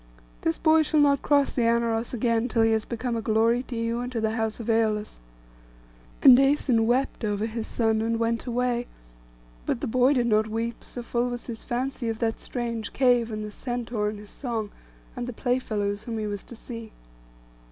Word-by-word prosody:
This 165 - 0
boy 320 0 +4
shall 310 0 +2
not 280 -2 +4
cross 285 -1 +2
the 250 - 0
Anauros 230 0 +1
again, 230 -1 +1
till 230 -1 +2
he 225 - +4
has 220 -1 +1
become 235 0 -3
a 225 - -1
glory 225 +2 +2
to 255 -1 -7
you 230 +1 -1
and 245 +1 -4
to 235 - -2
the 220 0 0
house 220 0 -2
of 230 - -5
Æolus.' 220 -2 0 1.0
And 260 -3 +10
Æson 270 -4 +3
wept 255 +1 0
over 210 0 0
his 225 0 -4
son 220 -2 +1
and 230 +1 0
went 230 +1 -1
away; 245 0 0 0.8
but - - 0
the - - -3
boy 255 +4 +3
did 245 -3 +2
not 215 -1 +3
weep, 230 +1 -3
so 245 - -7
full 240 +1 -1
was 245 0 -5
his 230 -2 -7
fancy 245 -1 -2
of 225 - -2
that 225 -1 -1
strange 235 -3 -4
cave, 245 -3 +3
and 215 -1 -4
the 210 - -7
centaur, 235 -2 -2
and 210 - -6
his 205 0 -12
song, 230 -6 -4 0.4
and 245 0 -4
the 250 - -5
playfellows 215 -5 -1
whom 230 -2 -4
he 215 - -2
was 205 -1 -4
to 240 - -11
see. 230 -1 -9
230 Hz, 205 wpm, -26 LUFS, 220-245 Hz, 1.0 s, And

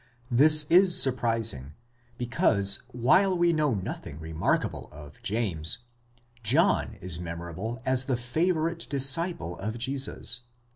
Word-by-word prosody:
This 155 +5 +6
is 180 0 +5
surprising; 115 - -1 0.4
because, 100 -5 +2
while 175 +11 +2
we 170 0 +2
know 150 -6 0
nothing 85 -6 -7
remarkable 80 0 -3
of 75 0 -14
James, 100 -4 -1 0.6
John 140 - +1
is 85 -2 0
memorable 85 +7 -6
as 130 0 +1
the 130 -3 -1
favourite 165 +6 -2
disciple 140 - +2
of 110 +3 -5
Jesus. 130 -1 -2
120 Hz, 110 wpm, -26 LUFS, 95-155 Hz, 0.6 s, This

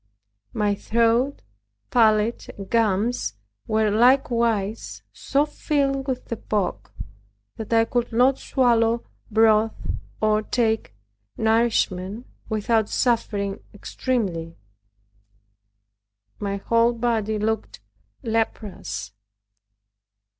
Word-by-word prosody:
My 210 -1 +1
throat, 230 - +1 0.5
palate, 220 -1 +2
and 195 -1 -9
gums 215 - +1 0.3
were 215 -1 +2
likewise 230 -3 +2
so 280 +2 +1
filled 275 -2 -1
with 255 -1 -3
the 230 - -4
pock, 210 -3 -2 0.7
that 220 - -7
I 225 0 +4
could 240 +1 -1
not 255 +4 +3
swallow 235 -3 +2 0.2
broth, 220 0 +4 0.4
or 215 0 +2
take 220 - -1 0.4
nourishment 220 -2 +1 0.2
without 220 0 +1
suffering 205 -5 0 0.2
extremely. 190 -8 -3 1.8
My 200 -1 -2
whole 230 +4 +2
body 225 -2 0
looked 220 +1 -2 0.4
leprous. 220 - -3
225 Hz, 85 wpm, -23 LUFS, 210-240 Hz, 1.8 s, I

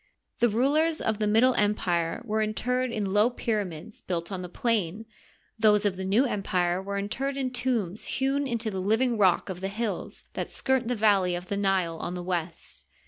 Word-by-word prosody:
The 240 - +4
rulers 300 +8 +2
of 220 -1 -1
the 210 - +1
Middle 230 +5 +4
Empire 180 -6 0
were 220 -1 0
interred 250 +4 0
in 205 -4 -2
low 210 +3 +5
pyramids 210 -5 -3
built 170 0 -3
on 190 -2 -3
the 180 - -6
plain, 215 -1 -1 0.5
those 210 -1 +4
of 200 -2 +2
the 190 - -5
New 210 +8 +3
Em 210 -6 -1
pire 180 -1 0
were 200 +1 -4
interred 265 +8 -2
in 260 -2 -1
tombs 235 -6 -1
newn 275 +1 +1
into 230 -3 -2
the 190 - -3
livine 225 +6 +2
rock 190 -5 +3
of 185 -2 -6
the 190 - -1
hills 215 +2 -4
that - - -3
skirt 265 -2 0
the 245 - 0
valley 200 -5 +3
of 180 +1 -7
the 200 - -1
Nile 190 -4 +1
on 175 - -4
the 180 - -5
west. 175 -2 -3
210 Hz, 195 wpm, -27 LUFS, 185-240 Hz, 0.5 s, low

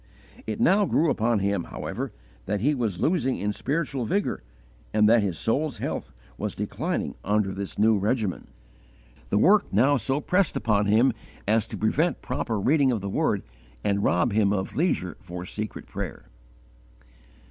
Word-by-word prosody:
It 110 -1 -3
now 200 +3 +4
grew 160 0 +2
upon 115 +1 +1
him, 100 -2 0
however, - - -5 0.4
that 105 +1 0
he 145 +6 +3
was 110 -9 -2
losing 155 -7 +1
in 105 +1 -1
spiritual 140 +1 -2
vigour, 200 - -1 0.5
and 105 0 +5
that 115 +1 +5
his 95 -5 -2
soul's 135 +2 0
health - - -4 0.3
was - - -3
declining - - -2
under 105 -1 +1
this 100 0 -6
new 110 0 +4
regimen. 105 -1 -1 0.8
The - - +2
work - - +4
now 135 +8 +4
so 135 +3 0
pressed 180 +4 +1
upon 105 -2 +1
him 115 +5 +4 0.3
as 110 +1 +2
to - - -6
prevent 155 +10 +1
proper 110 -3 -2
reading 135 +4 +3
of 115 -5 -1
the 100 - -4
Word - - 0 0.4
and 100 0 +1
rob 90 +6 +2
him 105 -2 +3
of 95 -2 -2
leisure 145 - 0
for 90 -2 -7
secret 110 +2 -5
prayer. - - -6
110 Hz, 160 wpm, -26 LUFS, 100-135 Hz, 0.8 s, and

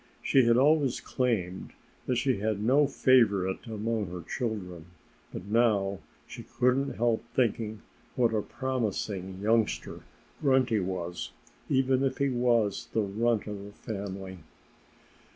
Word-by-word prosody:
She 130 -3 +4
had 120 0 +4
always 140 -1 +3
claimed 100 -8 -2 0.3
that 125 - +1
she 130 -1 +1
had 105 0 -1
no 135 +7 +4
favorite 110 -8 +2
among 110 -1 -2
her 90 -1 -7
children. 90 -6 -4 0.4
But 90 - -7
now 105 -3 +2 0.3
she - - -9
couldn't 130 +2 0
help 115 -1 +1
thinking 110 -3 0 0.3
what 120 -3 +2
a 110 - +1
promising 105 -7 -3
youngster 110 0 0 0.4
Grunty 130 -5 +3
was, 90 -2 -4 0.4
even 130 0 +2
if 135 - 0
he 140 0 +1
was 120 -3 +1
the 110 - +2
runt 110 +3 0
of 105 -2 -6
the 100 0 -11
family. 95 -3 -6
110 Hz, 130 wpm, -29 LUFS, 100-125 Hz, 0.4 s, She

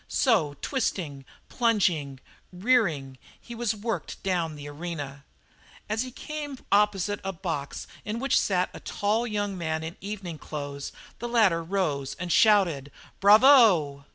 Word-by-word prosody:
So, 175 - +2
twisting, 165 - -2 0.2
plunging, 175 - +1 0.3
rearing, 180 - +1 0.2
he 235 - -10
was 235 -2 -1
worked 225 +2 -4
down 170 -5 -1
the 145 0 -9
arena. 145 -2 -6 0.6
As 215 +1 -1
he 255 - -4
came 290 +1 -6
opposite 205 -1 +2
a 195 - -2
box 160 -5 -4 0.2
in 215 +2 -3
which 275 +3 +2
sat 185 -2 0
a - - -8
tall 215 +4 -1
young 205 -2 -2
man 160 -2 -2
in 160 +3 -6
evening 190 -6 -6
clothes 145 -2 -6 0.3
the 240 - -4
latter 210 -8 +3
rose 160 -7 -1
and 180 -1 -5
shouted: 175 -12 +4 0.3
"Bravo!" 205 - +6
190 Hz, 135 wpm, -27 LUFS, 150-220 Hz, 0.6 s, Bravo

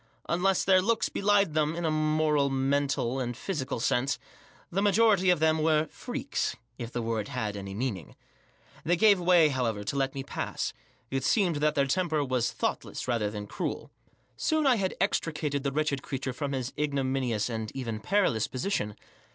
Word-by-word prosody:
Unless 180 +3 +2
their 185 -1 +5
looks 225 +4 +1
belied 200 -4 +2
them, 155 +1 +1
in 170 0 -3
a 160 - +2
moral, 155 -2 +2
mental, 135 -1 0
and 120 -2 -3
physical 140 -7 -3
sense, 125 +4 +1 0.5
the 190 +3 0
majority 205 -2 +4
of 180 -3 +4
them 160 0 +3
were 155 0 +3
freaks," - - -3 0.2
if 120 -1 -5
the 120 - -3
word 110 -2 -2
had 105 -1 -3
any 100 -1 -6
meaning. 105 - -4 0.7
They 175 - +2
gave 200 +1 +5
way* 175 -3 +5
however, 120 -6 -1
to 105 - -3
let 135 0 0
me 135 - -3
pass; - - -3 0.4
it 135 -1 -1
seemed 180 - +2
that 150 0 +1
their 140 - +3
temper 155 0 0
was 130 -3 0
thoughtless - - -3
rather 115 -4 0
than 105 -1 -6
cruel. - - -4 0.5
Spon 315 - +1
I 255 -3 +5
had 190 -2 -1
extricated 150 -6 0
the 140 0 -1
wretched 150 -1 0
creature 135 -2 -4
from 140 +2 -3
his 130 -1 -2
ignominious^ 135 -6 -1
and 110 -3 -4
even 115 -5 -3
perilous, 180 - +1
position. 125 - -2
140 Hz, 175 wpm, -28 LUFS, 125-170 Hz, 0.7 s, their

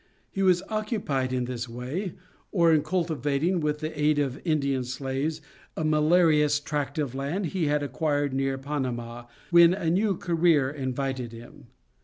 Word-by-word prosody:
He 195 - -3
was 185 -1 +3
occupied 210 - -2
in 125 -1 -1
this 120 -1 -5
way, 135 - -4 0.4
or 170 -4 +4
in 155 - +4
cultivating 160 0 0
with 150 -1 -1
the 155 -1 -4
aid 150 0 +3
of 140 -2 -1
Indian 140 -6 0
slaves 135 +5 -3 0.4
a 160 - -1
malarious 155 -1 +3
tract 145 +1 -3
of 145 -5 -1
land 145 +9 -2
he 175 -5 0
had 145 0 +1
acquired 145 0 -1
near 135 0 0
Panama, 125 -4 -4 0.3
when 170 +1 +7
a 170 -5 -1
new 195 +1 +1
career 165 -5 +2
invited 130 -3 -3
him. 115 +1 -13
150 Hz, 155 wpm, -26 LUFS, 135-170 Hz, 0.4 s, when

